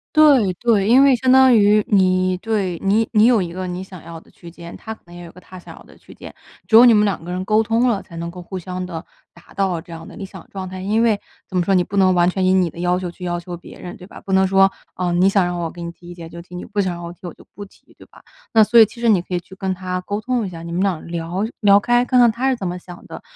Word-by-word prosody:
对 280 -11 +5
对。 210 0 +1
因 255 +4 +6
为 275 -2 +5
相 255 +1 +1
当 260 -1 +6
于 210 0 +4
你， 185 -2 +2
对， 195 -5 -2
你 210 +3 +2
你 215 0 +5
有 235 -3 +4
一 175 -2 -4
个 185 0 -5
你 180 +1 -5
想 185 -3 -13
要 165 0 -10
的 - - -23
区 170 - -14
间， 170 0 -11
他 220 - -8
可 220 - -19
能 175 -1 -15
也 175 - -10
有 170 - -11
一 - - -17
个 180 - -14
他 185 0 -13
想 - - -13
要 - - -15
的 - - -19
区 - - -17
间， - - -12 0.3
只 220 - +2
有 235 +2 +9
你 235 - +7
们 210 -1 +3
两 195 -5 -2
个 175 - -7
人 180 +1 -3
沟 215 +2 +2
通 230 +3 +1
了， 210 -5 0
才 170 - -15
能 170 0 -5
够 180 +1 -10
互 185 +2 -8
相 185 +1 -6
的 165 -2 -7 0.3
达 170 - -19
到 190 -4 -1
这 170 - -16
样 165 0 -10
的 - - -12
理 195 - -7
想 190 - -13
状 190 -1 -7
态。 185 0 -8
因 215 +4 0
为 220 -3 +2 0.3
怎 185 - -4
么 180 - +2
说， 195 +2 +1
你 180 - +3
不 200 +3 -6
能 190 -1 +4
完 175 0 +3
全 190 +1 -2
以 185 - +3
你 185 -2 +2
的 165 - -13
要 180 +1 0
求 180 -2 -5
去 180 - -13
要 175 -1 -2
求 175 +1 -8
别 175 - -14
人， 180 - -8
对 180 - -13
吧？ - - -13
不 195 - -6
能 190 0 +3
说： 195 0 +4 0.2
“啊， 180 -1 -2
你 180 +3 +3
想 195 -2 +2
让 175 0 -3
我 170 -1 -3
给 175 - -11
你 170 - -6
提 175 0 -16
意 - - -8
见 165 -2 -10
就 170 +1 -10
提， 180 +1 -13
你 180 - -7
不 205 0 -2
想 185 -2 -2
让 170 - -9
我 170 - -7
提 - - -27
我 170 - -8
就 - - -19
不 205 - -9
提，” 195 - -24
对 - - -16
吧？ - - -20 0.3
那 220 -1 +6
所 230 +3 +4
以 225 - +9
其 235 - -14
实 235 - +2
你 200 -5 +3
可 180 - -10
以 - - 0
去 190 +2 -15
跟 190 -1 -3
他 185 0 -5
沟 205 +3 -4
通 245 -1 -2
一 - - -6
下， 165 -2 -10
你 170 - -8
们 175 +2 -2
俩 190 -5 -1
聊 170 +3 -4 0.2
聊 200 -2 +5
开， 240 +3 +2
看 250 0 +2
看 240 -2 +5
他 255 +4 -1
是 260 - +1
怎 195 -6 -5
么 180 +1 -5
想 175 -1 -13
的， - - -10
185 Hz, 350 characters per minute, -19 LUFS, 175-210 Hz, 0.3 s, 有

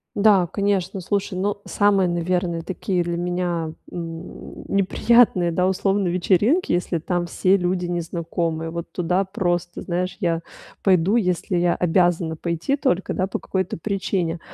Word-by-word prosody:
Да, 200 -4 +4
конечно, 195 0 -1
слушай, 195 0 -2
ну, 200 +2 -1
самые, 200 -2 +3
наверное, 175 0 -1
такие 180 0 -2
для 170 0 -2
меня, 175 -2 -2 0.2
м, 165 0 -8
неприятные, 195 -1 +4
да, 180 +2 +1
условно, 195 +1 +1
вечеринки, 195 - +2
если 175 -1 0
там 175 +2 -1
все 185 +3 +2
люди 180 -1 -1
незнакомые. 165 -1 -2
Вот 170 +1 -5
туда, 180 +2 0
просто, 175 -3 -2
знаешь, 180 +1 -2
я 170 -2 0 0.4
пойду, 190 +3 +4
если 180 -3 0
я 175 0 +2
обязана 175 -2 +1
пойти 170 - -1
только, 260 - 0
да, 185 - 0
по - - -4
какой-то 190 -2 -2
причине. 180 -3 -2
180 Hz, 140 wpm, -22 LUFS, 170-195 Hz, 0.4 s, Да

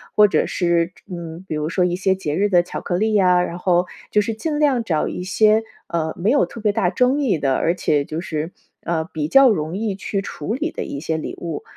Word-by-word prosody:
或 210 0 +7
者 - - +2
是 170 0 +1 0.2
嗯， 170 0 -7
比 - - -3
如 150 0 -2
说 180 0 +1
一 175 0 +1
些 190 0 +2
节 155 -6 -3
日 205 +1 +3
的 180 -3 +4
巧 175 - -6
克 175 - -3
力 220 +2 +1
呀， 180 -3 +4
然 175 0 -4
后 180 -1 +2 0.3
就 210 - +4
是 225 +2 -2
尽 295 +6 -3
量 270 -6 +2
找 160 -8 0
一 180 - -5
些， 215 +4 +3 0.2
呃， 160 -2 -2
没 190 +5 0
有 285 - +4
特 230 - -10
别 210 -1 +2
大 180 -3 +1
争 250 +9 +2
议 240 - +1
的， 135 -2 +1
而 170 - +1
且 145 -5 +1
就 155 +3 -4
是， 160 -1 -4 0.3
呃， 165 -2 0
比 150 -2 -2
较 270 - +7
容 160 -4 -1
易 205 -1 -2
去 195 0 -3
处 185 0 -5
理 310 +6 -2
的 - - -4
一 140 - -5
些 160 0 -1
礼 155 - -5
物。 165 -4 -5
180 Hz, 260 characters per minute, -21 LUFS, 165-215 Hz, 0.3 s, 或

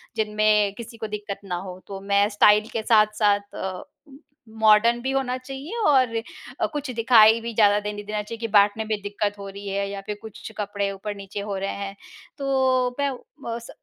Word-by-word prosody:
जिनमें 210 -1 +2
किसी 235 0 -9
को 220 -1 -4
दिक्कत 205 -1 -5
ना 180 -2 -3
हो, 180 0 -7
तो 195 -1 -6
मैं 200 +1 +3
स्टाइल 210 0 +5
के 225 - -2
साथ-साथ 210 -2 +2
अ, 185 -1 -5 0.2
उ 270 -1 -14 0.4
मॉडर्न 220 +2 +5
भी 265 +2 -2
होना 265 -2 -1
चाहिए। 270 - -7
और 260 -5 +4 0.4
अ, - - +2
कुछ 290 -2 -4
दिखाई 225 -1 +6
भी 230 0 -5
ज़्यादा 205 -2 +4
देने 210 0 -5
देना 210 0 -3
चाहिए 225 +2 -8
कि 230 - -2
बाँटने 205 +1 +4
में 215 -1 -1
दिक्कत 205 0 -2
हो 200 - -7
रही 200 +1 -9
है 200 0 -1
या 200 0 -5
फिर 210 - -4
कुछ 220 0 -9
कपड़े 200 -1 -2
ऊपर-नीचे 200 0 -6
हो 200 0 -4
रहे 195 +1 -2
हैं, 200 0 -6 0.4
तो 260 -2 +1
मैं 280 -1 +1 0.3
बस 235 0 -5
210 Hz, 190 wpm, -24 LUFS, 200-235 Hz, 0.4 s, दिखाई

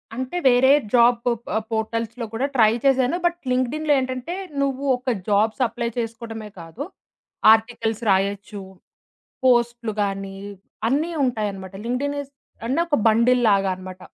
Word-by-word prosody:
అంటే 260 +7 -4
వేరే 260 +1 +5 0.2
జాబ్ 240 0 +5
ప 235 -3 -2 0.2
పోర్టల్స్‌లో 230 +1 -2
కూడా 240 +4 -1
ట్రై 220 -4 +5
చేశాను. 265 +3 +3
బట్ 345 0 +1
లింక్డ్ఇన్‌లో 290 +5 +1
ఏంటంటే 255 +5 -4 0.3
నువ్వు 275 0 -1
ఒక 250 -1 -2
జాబ్స్ 215 +4 +2
అప్లై 235 +1 -3
చేసుకోవడమే 225 -2 -5
కాదు, 165 - -7 0.7
ఆర్టికల్స్ 225 0 -1
రాయొచ్చు 200 +1 -1 0.8
పోస్టులు 240 -2 +2
గానీ 195 -1 -4 0.5
అన్నీ 300 +6 0
ఉంటాయన్నమాట. 205 -6 -3
లింక్డ్ఇన్ 280 +4 -2
ఇజ్ 280 -1 -12 0.4
అంటే 270 +7 +1
ఒక 295 -6 +1
బండిల్‌లాగా 220 -4 +3
అన్నమాట. 185 0 -10
235 Hz, 125 wpm, -22 LUFS, 215-255 Hz, 0.8 s, వేరే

